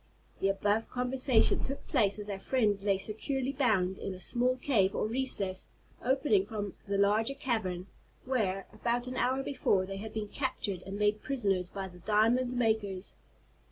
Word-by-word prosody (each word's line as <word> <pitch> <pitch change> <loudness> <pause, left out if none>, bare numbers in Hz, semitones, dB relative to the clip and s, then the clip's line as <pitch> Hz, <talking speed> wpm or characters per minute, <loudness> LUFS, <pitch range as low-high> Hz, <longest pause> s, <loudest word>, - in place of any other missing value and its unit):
The 195 - +2
above 205 +3 +1
conversation 250 -1 +3
took 275 +1 -4
place 200 -1 +2
as 210 -1 -6
our 200 -2 -4
friends 210 -5 +1
lay 200 -1 +3
securely 250 +7 -2
bound 215 -9 +1
in 195 - -4
a - - -10
small 250 +6 +1
cave, 215 -8 +2
or - - 0
recess, 215 -6 -2 0.4
opening 250 -7 +2
from 205 -3 -4
the 200 0 0
larger 215 +6 +3
cavern, 205 -10 -1 0.4
where, 200 -7 0
about 240 +1 -1
an 255 0 -5
hour 260 +2 +1
before, 210 -9 +1
they 195 +1 -5
had 215 +2 -6
been 215 -2 -4
captured 220 -9 -2
and 195 +1 -4
made 210 0 +2
prisoners 195 -9 0
by 195 0 -5
the 180 -1 -13
diamond 225 +6 +2
makers. 215 -5 0
215 Hz, 165 wpm, -31 LUFS, 195-250 Hz, 0.4 s, conversation